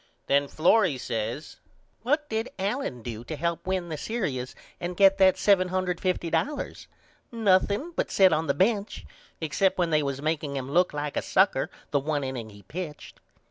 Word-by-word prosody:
Then 140 0 +2
Florrie 175 0 +3
says 115 +4 -4 0.4
What 295 +5 0
did 220 -1 -2
Allen 195 - -2
do 115 -1 -6
to 155 - -5
help 170 +4 -2
win 185 -2 -1
the 155 - -4
serious 145 - -3 0.2
and 175 0 -4
get 195 0 +5
that 190 -1 +6
$750.00? 185 - 0 0.4
Nothing 210 - +2
but - - -1
set 190 -3 +5
on 160 +1 0
the 140 - +1
bench 200 +4 0 0.3
except 160 +5 +1
when 175 -2 +1
they 155 -1 +3
was 140 -2 -2
makeing 150 -1 -2
him 135 0 -4
look 180 +4 +3
like 145 0 -4
a - - +1
sucker - - +2 0.2
the 145 - +3
1 145 0 -1
inning 130 -4 -4
he 100 -1 -15
pitched. 155 - -7
170 Hz, 165 wpm, -27 LUFS, 140-195 Hz, 0.4 s, that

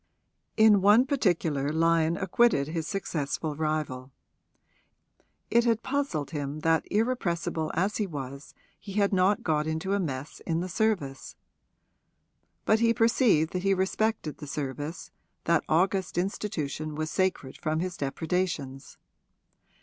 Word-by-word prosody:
In 215 -3 +6
one 210 +6 +6
particular 165 - 0
Lyon 165 +1 +2
acquitted 190 -6 +2
his 160 -1 -3
successful 155 -5 -3
rival; 155 -4 -2 1.4
it 235 +1 +5
had 230 -1 +1
puzzled 265 - -2
him 145 -1 -4
that 165 0 +1
irrepressible 175 -8 0
as 195 +5 0
he 210 - -1
was 140 -3 -7 0.2
he 200 - -9
had 200 0 +2
not 190 +2 +3
got 155 -1 0
into 160 +5 -2
a 200 - +1
mess 145 -5 -4
in 165 0 0
the 180 - -3
service. 175 -10 -1 1.3
But 215 - +4
he 230 0 +3
perceived 225 - +3
that 180 - -1
he 195 +1 +2
respected 190 -3 -1
the 150 - -8
service 145 +3 -5 0.3
that 170 -1 +2
august 185 +2 +1
institution 155 -5 -3
was 155 +1 -3
sacred 185 -8 -1
from 155 +1 -1
his 180 0 -3
depredations. 145 -1 -3
170 Hz, 130 wpm, -28 LUFS, 150-200 Hz, 1.4 s, In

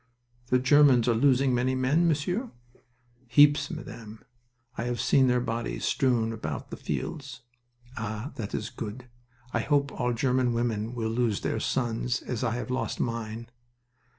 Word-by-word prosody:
"The 125 - +3
Germans 130 -2 +5
are 120 - +4
losing 130 +2 +3
many 125 +2 +1
men, 140 +7 +2
Monsieur?" 180 - 0 0.8
"Heaps, 145 +6 +5
Madame. 115 - -8 0.5
I 115 - -3
have 120 -1 -2
seen 135 -1 +4
their 125 0 +3
bodies 115 -1 -3
strewn 120 -4 +1
about 75 -10 -5
the - - -4
fields." 135 -5 -5 0.6
"Ah, 110 +3 -4
that 105 -3 -5
is 110 - -4
good! 115 +3 -7 0.5
I - - +1
hope 140 -2 +1
all 125 -1 -1
German 125 0 +1
women 115 -1 -1
will 110 -2 -2
lose 115 -3 0
their - - -1
sons, 120 0 -1
as 125 -1 -3
I 115 -1 0
have 120 0 -4
lost 130 - -2
mine." 115 0 -4
125 Hz, 150 wpm, -27 LUFS, 115-135 Hz, 0.8 s, Germans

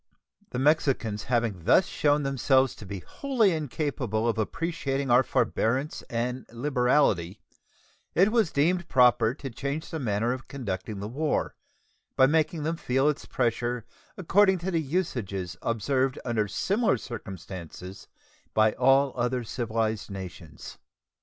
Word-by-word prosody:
The 125 - -5
Mexicans 130 -7 +1
having 115 -8 -1
thus 185 - +5
shown 145 -3 +1
themselves 135 -1 +2
to 105 - -11
be 100 -1 -6
wholly 250 - +1
incapable 140 - -2
of 115 -1 0
appreciating 140 - -2
our 125 +2 +7
forbearance 130 +2 0
and 125 +2 -2
liberality, 125 - +1 0.8
it 195 +5 +4
was 225 -7 +2
deemed 170 +4 +1
proper 125 -2 +4
to 140 -2 -6
change 140 +6 -4
the 160 - -3
manner 115 -1 0
of 130 +1 -8
conducting 110 -5 -5
the 100 - -4
war, 150 +7 -1 0.6
by 130 - +6
making 155 +2 +1
them 165 +2 -1
feel 135 -1 +1
its 150 - -3
pressure 120 -1 -1 0.3
according 190 +2 +4
to 180 +2 -3
the 165 -2 +1
usages 115 - -3
observed 130 +4 0
under 115 -3 0
similar 200 - +1
circumstances 95 -4 -8 0.5
by 110 0 +4
all 135 +2 +3
other 125 0 -1
civilized 110 -2 -2
nations. 90 -5 -9
125 Hz, 135 wpm, -27 LUFS, 110-150 Hz, 0.8 s, our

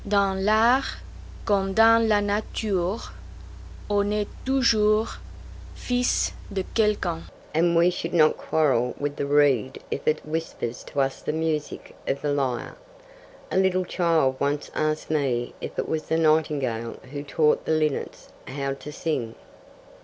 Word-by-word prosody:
Dans 200 -1 +2
l'art 220 +7 +3 0.5
comme 195 -2 +1
dans 225 +1 +6
la 210 -1 +3
nature 205 -1 -2 0.8
on 205 0 +1
est 210 0 0 0.2
toujours 220 -5 +2 0.6
fils 245 0 0 0.2
de 195 -1 -2
quelqu'un, 205 -7 +1 0.3
and 170 +2 +2
we 170 +2 +5
should 170 -1 -4
not 155 -3 +4
quarrel 130 -6 +1
with 145 0 -2
the 140 - -2
reed 140 -3 +3
if - - -4
it 155 - +1
whispers 155 -6 -4
to 145 - -4
us 135 0 -1
the - - -2
music 155 -1 -3
of 140 - 0
the 145 -1 +1
lyre. 130 -4 -2 0.8
A - - 0
little 185 -1 +2
child 165 -8 +1
once 145 +1 -1
asked 155 0 -1
me 130 -6 0
if - - -7
it - - -1
was 155 -1 -2
the 160 - +1
nightingale 150 -8 +1 0.2
who 145 -1 -4
taught 150 +1 +1
the - - -1
linnets 155 -2 -2 0.2
how 140 +1 -3
to 145 +2 -9
sing. 145 -8 -3
160 Hz, 145 wpm, -25 LUFS, 145-200 Hz, 0.8 s, dans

